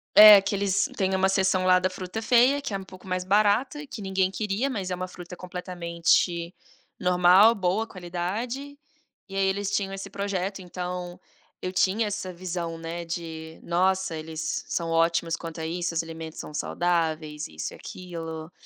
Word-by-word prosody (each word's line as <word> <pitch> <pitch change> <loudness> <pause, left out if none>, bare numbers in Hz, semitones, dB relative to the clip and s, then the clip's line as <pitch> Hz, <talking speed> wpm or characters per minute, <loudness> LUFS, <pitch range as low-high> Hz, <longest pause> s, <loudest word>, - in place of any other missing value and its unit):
é 210 -1 +11
que 195 +1 -2
eles 200 -1 +1
tem 190 -1 +1
uma 190 0 +3
seção 190 -1 +2
lá 185 0 +6
da 185 - +1
fruta 185 +3 -5
feia 250 +4 +4
que 275 - -5
é - - 0
um 195 - -8
pouco 185 0 -14
mais 185 0 -1
barata, 215 +9 +2
que 245 - -8
ninguém 190 -1 0
queria, 210 +6 -1
mas 200 -8 -3
é - - 0
uma 185 +1 -4
fruta 180 0 -10
completamente 170 -1 0 0.5
normal, 180 +4 +6
boa 195 +2 0
qualidade, 215 +10 -4 0.5
e 195 - -8
aí 195 0 +2
eles 200 +1 -1
tinham 195 -1 -1
esse 195 0 -6
projeto, 200 -1 -3
então, 180 0 -5 0.4
eu 185 - -3
tinha 195 +4 +2
essa 195 -3 -4
visão, 170 -2 -4
né, 165 +1 -5
de: 160 -1 -6
"Nossa, 185 0 +1
eles 160 +1 -4
são 170 -1 -2
ótimos 165 0 +2
quanto 165 -1 -7
a - - -3
isso, 175 +1 -2
os 165 - 0
alimentos 160 -1 -8
são - - -7
saudáveis, 160 -2 -1
isso 80 0 -6
e - - -10
aquilo". 165 -2 -7
185 Hz, 175 wpm, -26 LUFS, 170-195 Hz, 0.5 s, é